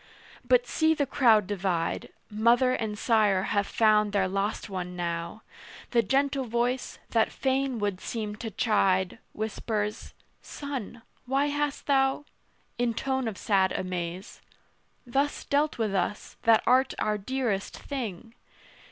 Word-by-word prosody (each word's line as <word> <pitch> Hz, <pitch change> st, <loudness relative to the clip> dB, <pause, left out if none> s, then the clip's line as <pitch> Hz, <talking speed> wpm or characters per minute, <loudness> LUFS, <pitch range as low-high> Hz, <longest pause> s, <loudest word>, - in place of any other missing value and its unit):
But -, -, +3 dB
see 320 Hz, 0 st, +2 dB
the 285 Hz, -, +1 dB
crowd 235 Hz, -7 st, +4 dB
divide: 185 Hz, -4 st, -2 dB, 0.2 s
Mother 235 Hz, +4 st, +3 dB
and 220 Hz, -4 st, -2 dB
sire 210 Hz, -5 st, +3 dB
have 200 Hz, -1 st, +1 dB
found 215 Hz, -2 st, +3 dB
their 195 Hz, -2 st, +2 dB
lost 195 Hz, +4 st, -2 dB
one 180 Hz, -3 st, -5 dB
now: 170 Hz, +3 st, -4 dB, 0.5 s
The 235 Hz, -, +4 dB
gentle 270 Hz, +4 st, +1 dB
voice, 240 Hz, +2 st, -1 dB
that 225 Hz, -1 st, +2 dB
fain 265 Hz, -1 st, 0 dB
would 205 Hz, -3 st, -2 dB
seem 215 Hz, -3 st, -4 dB
to 225 Hz, 0 st, -5 dB
chide 195 Hz, -3 st, +1 dB
Whispers 215 Hz, -1 st, -3 dB, 0.3 s
"Son, 255 Hz, -5 st, -6 dB, 0.2 s
why 275 Hz, +3 st, +2 dB
hast 290 Hz, 0 st, -2 dB
thou" 270 Hz, 0 st, +2 dB, 0.5 s
In 240 Hz, -2 st, +1 dB
tone 265 Hz, -1 st, -1 dB
of 210 Hz, -4 st, -4 dB
sad 190 Hz, -2 st, +2 dB
amaze 180 Hz, 0 st, -4 dB, 0.6 s
"Thus 275 Hz, +4 st, 0 dB
dealt 295 Hz, +2 st, +1 dB
with 220 Hz, -4 st, -1 dB
us, 195 Hz, +2 st, -2 dB
that 225 Hz, -1 st, +5 dB
art 260 Hz, +1 st, +3 dB
our 210 Hz, -1 st, 0 dB
dearest 220 Hz, -3 st, -2 dB
thing? 230 Hz, -6 st, -6 dB
225 Hz, 135 wpm, -28 LUFS, 200-265 Hz, 0.6 s, that